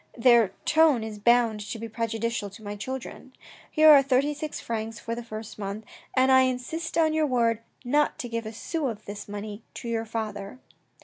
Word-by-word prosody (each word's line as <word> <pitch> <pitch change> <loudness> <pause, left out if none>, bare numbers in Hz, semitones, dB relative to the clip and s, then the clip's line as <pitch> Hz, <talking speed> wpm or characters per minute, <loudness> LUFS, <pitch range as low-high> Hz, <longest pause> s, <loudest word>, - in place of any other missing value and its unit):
Their 235 -4 +5
tone 310 -7 +4
is 215 -1 -6
bound 235 -1 +3
to 210 +3 -5
be 230 +1 -6
prejudicial 230 -1 -2
to 195 +3 -14
my 205 0 -5
children. 260 +3 -7 0.4
Here 310 0 +7
are 285 -2 +9
thirty 275 +2 +2
six 300 +1 -5
francs 225 -1 -4
for 230 - -4
the 240 +1 -5
first 215 -2 -8
month, 205 +2 -5 0.3
but 260 0 +4
I 260 0 +7
insist 260 +7 -2
on 315 -1 +3
your 310 -1 +2
word 230 -4 +2 0.3
not 295 +4 +2
to 245 - -5
give 230 -1 -4
a - - -5
sou 295 +6 -3
of 215 -3 -6
this 205 0 -8
money 205 +1 -6
to - - -7
your 230 -1 -1
father." 215 -1 -5
230 Hz, 195 wpm, -26 LUFS, 215-260 Hz, 0.4 s, are